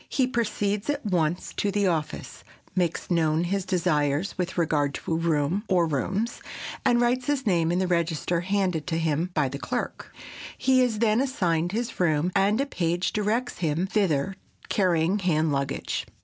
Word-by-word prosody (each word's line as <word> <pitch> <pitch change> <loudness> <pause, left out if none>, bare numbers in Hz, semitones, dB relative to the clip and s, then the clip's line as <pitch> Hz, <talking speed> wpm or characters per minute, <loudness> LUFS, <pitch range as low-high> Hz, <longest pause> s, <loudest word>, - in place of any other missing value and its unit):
He 265 - +2
proceeds 210 -3 -1
at 290 -3 -1
once 175 -4 0
to 205 - +1
the 205 0 +1
office, 165 -5 -2 0.3
makes 180 -1 -1
known 160 -1 +2
his 190 +1 -1
desires 155 -2 0
with 180 -1 -3
regard 150 -4 +1
to - - -3
a - - +2
room 165 +3 +1
or 180 -3 +4
rooms, 190 - -2 0.4
and 240 - +4
writes 245 +1 +1
his 285 -3 0
name 170 -5 +2
in 175 - +1
the 185 - +1
register 170 -1 0
handed 185 -4 0
to 165 -2 0
him 165 +1 0
by 150 -3 +2
the 140 +2 -5
clerk. 245 +8 -4 0.5
He 260 -1 +3
is 245 -4 +1
then 220 +1 +3
assigned 175 -11 0
to 200 - -5
his 235 0 -3
room, 170 0 +2
and 200 +3 +3
a 275 - +2
page 175 -8 -1
directs 220 +4 -1
him 165 +1 0
thither, 190 -3 0 0.3
carrying 180 0 +2
hand 160 -4 +1
luggage. 140 -1 -2
180 Hz, 175 wpm, -26 LUFS, 160-210 Hz, 0.5 s, or